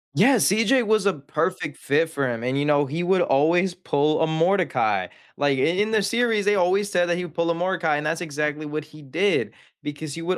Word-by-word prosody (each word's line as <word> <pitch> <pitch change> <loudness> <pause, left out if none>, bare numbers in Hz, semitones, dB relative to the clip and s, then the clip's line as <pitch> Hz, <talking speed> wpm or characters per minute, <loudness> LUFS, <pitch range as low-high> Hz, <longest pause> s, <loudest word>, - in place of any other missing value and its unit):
Yeah, 260 +7 +5
CJ 225 +6 +3
was 215 -2 +2
a 195 - +3
perfect 155 +1 -3
fit 145 +4 0
for 140 -5 -2
him, 115 0 -5
and, 130 +2 -1
you 145 +1 0
know, 145 -1 +2
he 155 +6 -4
would 185 0 +2
always 170 +6 +2
pull 155 -3 0
a 160 - +2
Mordecai. 170 +1 +1 0.3
Like 140 -1 +1
i - - 0
in 200 +6 +1
the 215 -2 +1
series, 225 -1 0
they 205 - +3
always 195 +3 +1
said 175 -1 +2
that 175 - +1
he 180 - -3
would 160 - -11
pull 170 0 -1
a 170 - +1
Mordecai, 170 -4 0
and 150 - -4
that's 165 +3 -2
exactly 150 -1 -3
what 155 0 -4
he 155 0 -15
did 170 +9 0 0.3
because 145 0 -6
he 165 - -6
would 185 +2 -1
165 Hz, 230 wpm, -23 LUFS, 150-190 Hz, 0.3 s, Yeah